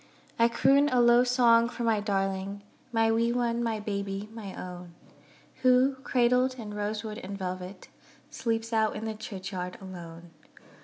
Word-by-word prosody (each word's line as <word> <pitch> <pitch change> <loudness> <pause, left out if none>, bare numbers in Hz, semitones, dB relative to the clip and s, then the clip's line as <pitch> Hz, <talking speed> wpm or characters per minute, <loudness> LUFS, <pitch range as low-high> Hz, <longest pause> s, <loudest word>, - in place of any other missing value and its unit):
I 230 - +6
croon 270 +5 +4
a 255 - +2
low 240 0 +6
song 240 -2 +4
for 240 - -5
my 225 -2 +2
darling, 195 -1 -2 0.3
My 225 -1 +3
wee 230 +1 +2
one, 240 -1 0
my 225 -2 -1
baby, 200 -1 -4
my 210 -4 -8
own; 180 -1 -8 0.7
Who, 255 +1 +4
cradled 255 -1 +2
in 215 -4 -7
rosewood 210 +1 -4
and 200 -3 -7
velvet, 185 0 -6 0.4
Sleeps 230 0 -2
out 220 -1 +2
in 215 +1 -5
the 220 - -2
churchyard 190 -3 -6
alone. 175 -3 -10
220 Hz, 150 wpm, -28 LUFS, 195-235 Hz, 0.7 s, I